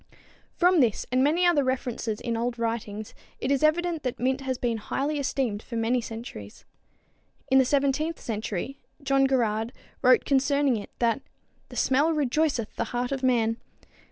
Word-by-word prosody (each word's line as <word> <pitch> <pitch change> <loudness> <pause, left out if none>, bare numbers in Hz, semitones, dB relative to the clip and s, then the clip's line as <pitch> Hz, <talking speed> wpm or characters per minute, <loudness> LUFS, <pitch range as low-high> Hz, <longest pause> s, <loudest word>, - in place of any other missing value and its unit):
From 360 0 +4
this 235 -7 +2
and 255 +1 +3
many 330 +6 +3
other 335 -5 +4
references 245 -4 -2
in 235 -1 -2
old 235 +1 -2
writings 225 -2 -3 0.3
it 265 - -1
is 275 - +2
evident 330 +1 +2
that 250 -3 -3
mint 260 +2 0
has 260 -1 -2
been 235 -2 -1
highly 285 +7 -2
esteemed 255 -6 -1
for 235 - -8
many 230 +2 +1
centuries. 225 - -9 0.9
In 265 - +7
the 265 - +4
seventeenth 285 +4 +1
century 220 +3 -4 0.2
John 275 0 +3
Gerarde 225 -3 0 0.3
wrote 255 -1 +5
concerning 280 -1 +2
it 205 - -7
that 235 +1 +1 0.5
"the - - -11
smelle 290 +5 +2
rejoyceth 285 -4 0
the - - 0
heart 245 +1 -2
of 270 -1 -2
man." 230 -3 +2
255 Hz, 160 wpm, -26 LUFS, 230-280 Hz, 0.9 s, In